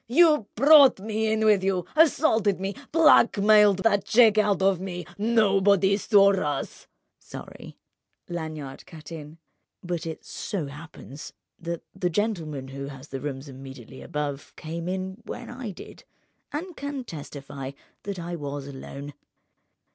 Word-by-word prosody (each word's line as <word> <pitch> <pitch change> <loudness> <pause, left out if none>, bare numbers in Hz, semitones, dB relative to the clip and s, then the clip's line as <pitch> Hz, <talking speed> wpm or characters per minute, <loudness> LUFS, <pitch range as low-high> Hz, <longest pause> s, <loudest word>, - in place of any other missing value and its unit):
"You 300 -3 +4
brought 280 -1 +7
me 220 +2 -1
in 220 0 +1
with 210 -3 +4
you, 190 -3 0
assaulted 255 - +3
me, 195 +1 -3 0.2
blackmailed 210 - +5
that 205 -3 +3
cheque 220 -2 +5
out 205 -3 +2
of 190 -2 +3
me! 180 -2 -6
Nobody 200 -3 +3
saw 200 -1 +4
us—" 150 -7 -3 0.3
"Sorry," - - -11 0.5
Lanyard 155 -5 -6
cut 155 -3 -12
in; 155 -1 -9 0.5
"but 175 -2 -4
it 160 - -7
so 195 -9 -4
happens, 145 0 -10 0.3
that 170 0 -5
the 185 -1 -1
gentleman 160 -9 -2
who 140 +1 -6
has 135 0 -11
the 135 -1 -6
rooms 140 0 -5
immediately 130 -1 -11
above 145 -1 -5
came 165 +2 -6
in 190 +3 -4
when - - -7
I 245 -2 -6
did, 190 - -11 0.5
and 335 +4 -5
can 285 -2 -5
testify 140 - -8 0.3
that 200 -1 -5
I 175 0 -5
was 145 -3 -5
alone. 140 +1 -8
185 Hz, 140 wpm, -25 LUFS, 150-215 Hz, 0.5 s, brought